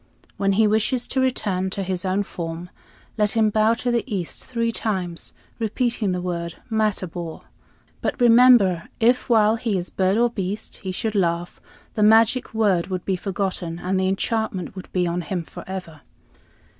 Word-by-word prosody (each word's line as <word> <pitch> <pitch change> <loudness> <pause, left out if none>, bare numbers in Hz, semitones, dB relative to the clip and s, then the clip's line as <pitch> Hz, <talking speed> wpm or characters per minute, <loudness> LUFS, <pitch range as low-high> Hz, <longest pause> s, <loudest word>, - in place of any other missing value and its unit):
When 195 0 +1
he 215 +3 +4
wishes 220 +4 +1
to 260 - 0
return 200 -8 0
to 195 +1 -3
his 185 0 -3
own 190 +2 +1
form, 170 -1 -6 0.5
let 210 -1 +2
him 220 -2 +3
bow 220 +2 +3
to 245 +1 -2
the 235 -1 +1
east 185 -5 -4
three 230 -2 -1
times, 185 -7 -3 0.2
repeating 230 -2 0
the 180 0 -2
word 170 -2 -3 0.2
'Matabor.' 185 -6 -2 0.6
But - - -2
remember 235 -7 +5
if, 245 +3 +2
while 220 -1 +4
he 225 -4 -1
is 175 0 -5
bird 190 +2 +1
or 240 0 +3
beast, 200 -1 -4
he 190 - -5
should 215 +4 -2
laugh, 175 -3 -1 0.3
the 215 - -2
magic 225 +4 +4
word 205 -6 +2
would 185 -2 -4
be 190 - +1
forgotten, 185 -2 -3
and 185 +2 -1
the 190 - +1
enchantment 195 -1 -2
would 185 - -9
be 180 -1 +1
on 175 +1 -1
him 175 +1 -3
forever." 170 -3 -8
195 Hz, 170 wpm, -23 LUFS, 180-225 Hz, 0.6 s, remember